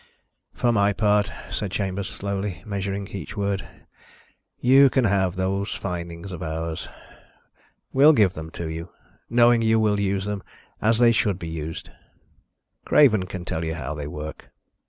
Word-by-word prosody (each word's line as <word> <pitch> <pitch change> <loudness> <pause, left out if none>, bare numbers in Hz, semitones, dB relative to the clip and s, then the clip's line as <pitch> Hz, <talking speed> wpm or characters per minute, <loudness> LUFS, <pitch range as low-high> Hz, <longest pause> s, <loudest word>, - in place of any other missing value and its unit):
"For 120 - +2
my 100 -2 +3
part," 105 -1 +2 0.2
said 105 - -2
Chambers, 95 0 -2
slowly, 100 -2 -4
measuring 100 -1 -3
each 100 +2 -7
word, 100 -1 -1 1.0
"you 135 +2 +6
can 130 0 +2
have 95 -3 +1
those 95 +2 -1
findings 85 0 -5
of 90 - -7
ours. 80 0 -4 1.1
We'll 140 +4 +7
give 105 - +4
them 80 -3 -7
to 85 - -5
you, 80 +2 -6 0.4
knowing 120 0 +5
you 110 0 +3
will 105 -2 +2
use 100 -1 0
them 105 -1 -3 0.4
as 110 +1 +3
they 120 0 +6
should 105 -4 +1
be 85 -3 -6
used. 80 0 -6 0.9
Craven 110 -11 +4
can 90 -1 -6
tell 80 -1 -3
you 80 0 -2
how 75 -2 -4
they 75 -1 -5
work. 75 +1 -7
100 Hz, 155 wpm, -24 LUFS, 85-105 Hz, 1.1 s, We'll